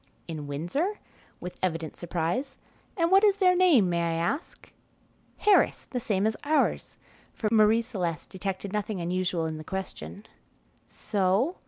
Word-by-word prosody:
"In 155 -3 -6
Windsor?" 175 - -2 0.4
with 180 0 -8
evident 165 -4 -2
surprise; 175 - -2 0.4
"and 335 0 +2
what 390 +2 +6
is 405 -2 +5
their 365 -2 +4
name, 340 - +5
may 170 -1 0
I 170 -1 0
ask?" 170 - -3 0.6
"Harris, 415 -1 +3
the 250 - -4
same 205 -4 0
as 220 0 +1
ours;" 305 +1 0 0.4
for 215 - -1
Marie 220 +1 +5
Celeste 180 - -4
detected 195 +1 -4
nothing 210 -1 -2
unusual 175 -1 -1
in 160 -1 -3
the - - -7
question. 190 +3 -6 0.6
"So?" 205 - 0
195 Hz, 145 wpm, -27 LUFS, 170-270 Hz, 0.6 s, what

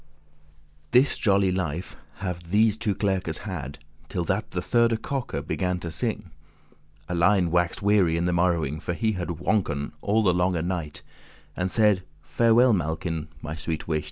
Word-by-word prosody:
This 130 - +4
jolly 100 -3 +2
life 90 -1 -3 0.3
have 85 -2 -5
these 105 +2 +4
two 110 -3 -1
clerkes 95 -6 -1
had, 75 - -6 0.3
Till 90 - -2
that 95 +5 -1
the 90 - -3
thirde 115 +4 +2
cock 135 -3 -3
began 90 -1 -1
to 85 - -5
sing. - - -3 0.8
Alein 90 +1 +3
wax'd 85 0 +1
weary 100 -5 +3
in 85 - 0
the 90 - +1
morrowing, 85 -4 +1
For 85 - -3
he 110 +5 +1
had 90 -4 -3
swonken* 85 -4 -1
all 110 +2 +2
the 90 -3 +4
longe 90 -2 +1
night, 85 -5 -4
*laboured - - -26
And 90 0 -1
saide; 105 -2 +3 0.2
"Farewell, 115 +9 +4
Malkin, 80 -2 -2 0.2
my 75 +1 -4
sweet 80 -1 -4
wight. 80 -1 +1
90 Hz, 160 wpm, -25 LUFS, 85-105 Hz, 0.8 s, This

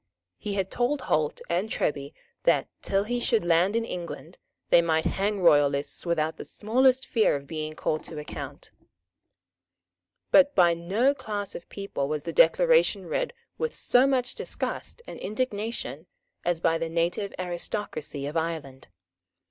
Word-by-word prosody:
He 205 -1 -4
had 195 -1 -1
told 255 +3 0
Holt 155 -9 0
and 180 +6 -1
Treby 140 -7 -1 0.3
that, - - +3
till 195 0 +1
he 240 +3 -2
should 230 -5 +1
land 175 +5 +3
in 230 0 +1
England, 175 -2 -7 0.3
they 170 - +8
might 160 -1 +1
hang 200 +1 0
royalists 145 -1 +3
without 160 -2 0
the - - -6
smallest 255 +4 +2
fear 220 -9 +2
of 140 0 -5
being 155 +1 -5
called 155 0 -1
to 160 - -8
account. 150 - -7 1.6
But 285 0 +6
by 175 -3 +6
no 200 +11 +1
class 210 -7 -5
of 170 - -9
people 195 -9 -3
was 150 0 -2
the - - -4
Declaration - - +4
read - - -1 0.3
with 475 0 -2
so 250 +2 +4
much 255 -2 +1
disgust 470 - -4
and - - -9
indignation 210 - -3 0.4
as 175 -1 0
by 165 0 +2
the 165 0 -2
native 170 +4 -1
aristocracy 175 -5 -3
of 145 +3 -5
Ireland. 160 -6 -3
180 Hz, 150 wpm, -27 LUFS, 160-230 Hz, 1.6 s, they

